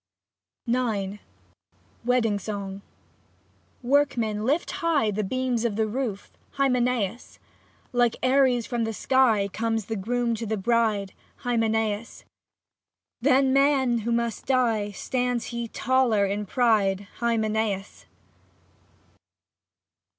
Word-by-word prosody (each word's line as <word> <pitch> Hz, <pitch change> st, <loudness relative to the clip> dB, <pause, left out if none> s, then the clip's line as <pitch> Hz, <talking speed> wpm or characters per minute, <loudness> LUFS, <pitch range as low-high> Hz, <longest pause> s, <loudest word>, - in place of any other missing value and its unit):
i? 235 Hz, -3 st, +1 dB
lit 195 Hz, +1 st, -5 dB, 0.9 s
WEDDING 230 Hz, -4 st, +2 dB
SONG 200 Hz, -1 st, -5 dB, 1.0 s
Workmen 240 Hz, -6 st, +1 dB
lift 290 Hz, +8 st, 0 dB
high 305 Hz, -10 st, +2 dB
The 210 Hz, +1 st, -2 dB
beams 250 Hz, +2 st, -1 dB
of 230 Hz, -4 st, 0 dB
the 220 Hz, +1 st, +1 dB
roof, 215 Hz, -3 st, -4 dB, 0.2 s
Hymenaeus! 250 Hz, -5 st, 0 dB, 0.6 s
Like 245 Hz, -1 st, +3 dB
Ares 255 Hz, -2 st, +3 dB
from 230 Hz, -2 st, -2 dB
sky 225 Hz, -4 st, +3 dB
Comes 225 Hz, +1 st, -2 dB
the 225 Hz, -, -3 dB
groom 235 Hz, +4 st, -1 dB
to 225 Hz, -, -5 dB
the 220 Hz, +1 st, -1 dB
bride, 210 Hz, -2 st, +1 dB, 0.3 s
Hymenaeus! 225 Hz, -2 st, -1 dB, 1.0 s
Than 265 Hz, 0 st, +4 dB
men 270 Hz, -3 st, +3 dB
who 230 Hz, +2 st, -3 dB
must 235 Hz, -1 st, -1 dB
die 230 Hz, -6 st, +2 dB
Stands 245 Hz, +3 st, -2 dB
he 235 Hz, 0 st, -3 dB
taller 235 Hz, -4 st, +2 dB
in 205 Hz, +1 st, -2 dB
pride, 210 Hz, -5 st, +2 dB, 0.2 s
Hymenaeus 220 Hz, -4 st, -1 dB
230 Hz, 105 wpm, -25 LUFS, 210-250 Hz, 1.0 s, Than